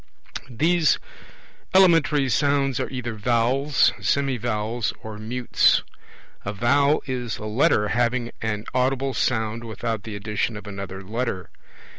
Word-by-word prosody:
These 160 +5 +2 0.8
elementary 165 -7 +5
sounds 140 0 +1
are - - -2
either 125 -3 -4
vowels, 125 +6 +2
semivowels, 120 -4 -1
or 110 -1 -7
mutes. 120 +3 +2 0.6
A 100 - -3
vowel 140 +8 +2
is 125 -4 -3
a 105 - -7
Letter 105 -1 +2
having 120 0 0
an 105 -1 -2
audible 130 +1 0
sound 110 -2 -1
without 115 -1 -4
the 105 0 -7
addition 105 +2 -2
of 105 - -10
another 95 -1 -7
Letter. 105 -3 -3
120 Hz, 120 wpm, -24 LUFS, 110-135 Hz, 0.8 s, elementary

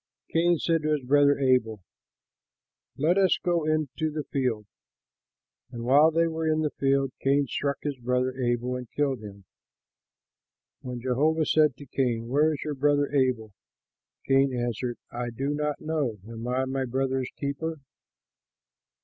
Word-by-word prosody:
Cain 170 +1 +3
said 165 0 +1
to 155 0 +1
his 145 -3 -1
brother 145 +2 +4
Abel, 125 -7 +1 1.1
"Let 170 +7 +2
us 190 -2 +4
go 170 -3 0
into 155 0 -1
the 150 0 -4
field." 125 -8 -2 1.0
And 120 -2 -7
while 140 +6 +6
they 165 +1 +2
were 160 -1 -2
in 155 0 +1
the 150 -2 0
field, 135 -1 +1
Cain 140 +1 +2
struck 140 +2 -2
his 145 -3 -3
brother 125 +1 0
Abel 125 0 -1
and 125 -2 -7
killed 140 -4 0
him. 100 -2 -11 1.3
When 125 -2 -6
Jehovah 150 +6 +1
said 150 -3 +3
to 145 - -11
Cain, 120 -3 -1
"Where 150 +4 +3
is 150 - -4
your 150 - -3
brother 145 +1 +1
Abel?" 125 -6 +1 0.7
Cain 135 0 +4
answered, 120 0 -2
"I 120 0 -3
do 135 +5 -2
not 150 0 -2
know; 150 -8 -2
am 115 +1 -7
I 130 +1 0
my 130 0 -2
brother's 130 +1 -1
keeper?" 145 +3 -3
135 Hz, 150 wpm, -27 LUFS, 125-150 Hz, 1.3 s, while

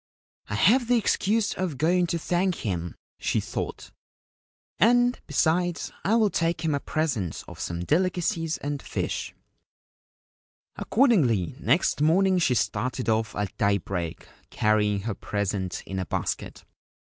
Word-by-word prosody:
* - - -32
I 100 - -2
have 230 - +4
the 245 0 +4
excuse 215 0 +1
of 175 -7 -3
going 175 +4 +2
to 170 - -1
thank 180 +2 0
him/ 85 -4 -3 0.2
she - - 0
thought; 110 +4 -5 0.4
' - - -54
and, 245 +1 +4
besides, 170 +3 +1
I 215 - +2
will 220 -3 +3
take 165 -1 0
him 155 - +1
a 140 - 0
present 135 - -2
of - - -11
some 85 0 -4
delicacies 170 - 0
and 145 -1 -4
fish/ - - -4 1.4
Accordingly, 165 - +2
next 165 -2 +2
morning 185 +4 +4
she 130 -7 +2
started 120 -1 -1
off 110 0 0
at 105 -2 -3
daybreak, 90 -4 -1 0.2
carrying 105 -2 +1
her 110 +1 -3
present 100 -3 -3
in 95 0 -4
a 95 - -3
basket. - - -3
155 Hz, 140 wpm, -26 LUFS, -, 1.4 s, have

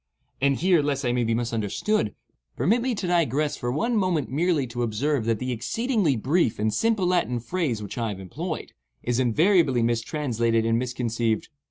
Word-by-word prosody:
And 140 0 +3
here, 175 +1 +3
lest 140 -2 -1
I 120 - +2
may 125 0 +1
be 115 0 +1
misunderstood, 115 - -1 0.4
permit 230 +6 +2
me 250 -1 0
to 200 - -4
digress 155 -4 +1
for 120 - -3
one 230 - 0
moment 185 - 0
merely 160 0 +1
to 120 0 -5
observe 120 +3 0
that 115 -1 +1
the 125 +3 -3
exceedingly 210 - 0
brief 135 +3 +1
and 110 0 0
simple 225 -4 +1
Latin 175 -9 +1
phrase 120 -4 -2
which 105 - -6
I 115 -1 -1
have 100 -2 -5
employed, 155 - -5 0.3
is 120 0 0
invariably 135 - +3
mistranslated 115 -1 0
and 115 0 +2
misconceived. 120 -3 -1
130 Hz, 175 wpm, -25 LUFS, 115-175 Hz, 0.4 s, And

